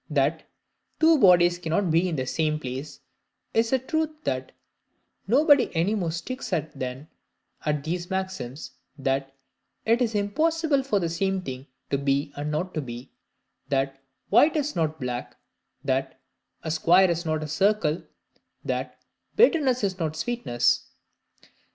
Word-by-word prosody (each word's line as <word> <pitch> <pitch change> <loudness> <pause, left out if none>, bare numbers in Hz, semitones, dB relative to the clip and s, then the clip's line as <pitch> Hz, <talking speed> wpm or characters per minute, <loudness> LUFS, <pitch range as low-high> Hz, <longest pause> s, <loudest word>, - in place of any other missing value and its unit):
That - - +1 0.6
"two 320 -1 +5
bodies 175 -4 +6
cannot 175 +2 0
be 170 +3 +3
in 165 - -2
the 130 -3 -2
same 155 +3 0
place" 135 +1 -6 0.5
is 225 0 +2
a 265 - +4
truth 315 +5 -1
that 130 0 -2 0.8
nobody 285 +4 +5
any 170 +6 +2
more 185 -6 -1
sticks 255 +11 -5
at 160 -2 -1
than 130 +2 -5 0.6
at 150 -1 0
these 175 +3 -3
maxims, 185 -8 -4 0.3
that 135 0 -1 0.5
"it 230 +2 +3
is 230 -3 +1
impossible 305 +8 +1
for 260 -7 0
the 170 - -1
same 190 +3 -1
thing 130 -1 -7 0.2
to 140 - +1
be 140 +1 0
and 145 +1 -3
not 170 +5 -2
to 155 - -1
be," 120 -1 -8 0.6
that 135 0 -1 0.3
"white 300 +2 +5
is 295 -1 -1
not 155 -2 -1
black," 125 -2 -4 0.5
that 135 0 -1 0.4
"a 160 - -2
square 175 +3 +5
is 170 0 -2
not 155 -2 -1
a - - -4
circle," 180 -1 +1 0.6
that - - -3 0.4
"bitterness 290 - +4
is 190 -2 -1
not 160 -2 -2
sweetness." 230 - 0
170 Hz, 145 wpm, -26 LUFS, 140-215 Hz, 0.8 s, bodies